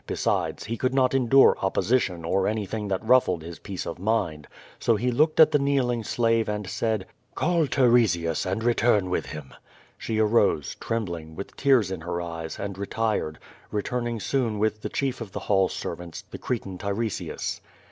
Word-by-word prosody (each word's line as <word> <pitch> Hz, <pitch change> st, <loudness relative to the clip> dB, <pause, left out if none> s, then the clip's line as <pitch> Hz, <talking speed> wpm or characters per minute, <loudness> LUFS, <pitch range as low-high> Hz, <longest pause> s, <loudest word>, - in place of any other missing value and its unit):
Besides, -, -, -1 dB
he 115 Hz, -, -4 dB
could 130 Hz, +2 st, 0 dB
not 130 Hz, -1 st, +3 dB
endure 135 Hz, +1 st, +5 dB
opposition 95 Hz, -3 st, +1 dB
or 95 Hz, +3 st, +1 dB
anything 105 Hz, 0 st, -2 dB
that 95 Hz, +2 st, -2 dB
ruffled 100 Hz, -10 st, +4 dB
his 85 Hz, 0 st, -8 dB
peace 95 Hz, -3 st, -6 dB
of 85 Hz, -, -6 dB
mind. 95 Hz, -8 st, -1 dB, 0.3 s
So 115 Hz, -, +3 dB
he 125 Hz, +4 st, 0 dB
looked 155 Hz, +6 st, +2 dB
at 155 Hz, -1 st, +8 dB
the 145 Hz, -, +3 dB
kneeling 130 Hz, -4 st, +1 dB
slave, 115 Hz, 0 st, +1 dB
and 105 Hz, -2 st, -3 dB
said; 110 Hz, 0 st, -1 dB, 0.3 s
"Call 170 Hz, -4 st, +2 dB
Tiresias, 115 Hz, -, +3 dB
and 95 Hz, +4 st, -2 dB
return 115 Hz, -5 st, +2 dB
with -, -, -1 dB
him/^ 75 Hz, -4 st, -8 dB, 0.5 s
She 110 Hz, -, -3 dB
arose^ 105 Hz, -, +2 dB
trem 115 Hz, -1 st, -1 dB
bling, 80 Hz, -3 st, -7 dB
with 100 Hz, -, -8 dB
tears 130 Hz, -9 st, +3 dB
in 95 Hz, -4 st, -4 dB
her 85 Hz, +1 st, -3 dB
eyes, 85 Hz, -2 st, -5 dB
and 100 Hz, -1 st, -5 dB
retired, 100 Hz, -6 st, -1 dB, 0.3 s
returning 120 Hz, +2 st, -2 dB
soon 115 Hz, -2 st, 0 dB
with 110 Hz, 0 st, 0 dB
the -, -, -4 dB
ehierf 130 Hz, -3 st, -2 dB
of 105 Hz, -4 st, -7 dB
the -, -, -4 dB
hall 95 Hz, -2 st, +2 dB
servants, 85 Hz, -1 st, -6 dB
the -, -, -7 dB
Cretan 100 Hz, -7 st, -4 dB
Tiresias. 100 Hz, +1 st, -3 dB
105 Hz, 175 wpm, -26 LUFS, 90-120 Hz, 0.5 s, at